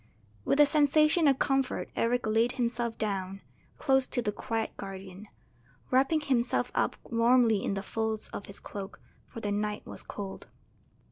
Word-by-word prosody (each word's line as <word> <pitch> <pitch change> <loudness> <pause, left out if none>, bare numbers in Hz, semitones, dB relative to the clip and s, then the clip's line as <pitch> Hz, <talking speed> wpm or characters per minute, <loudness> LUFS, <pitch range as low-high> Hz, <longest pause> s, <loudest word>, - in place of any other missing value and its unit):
With 280 - +2
a 295 - +9
sensation 305 +2 +4
of 270 -2 +4
comfort 270 -1 0
Eric 245 +1 +1
laid 225 +3 +2
himself 240 -2 -1
down 195 -2 -3 0.4
close 265 -1 +3
to 245 - 0
the 210 - 0
quiet 225 +1 -3
guardian, 195 +1 -8 0.6
wrapping 270 +5 +3
himself 255 -4 0
up - - +1
warmly 230 -2 +3
in 200 - -1
the 195 - -3
folds 220 0 -2
of 200 - -7
his 200 - -10
cloak, 200 -1 -8 0.3
for 230 - -9
the 205 - -2
night 210 +1 -2
was - - -6
cold. 195 -2 -7
230 Hz, 155 wpm, -29 LUFS, 205-265 Hz, 0.6 s, a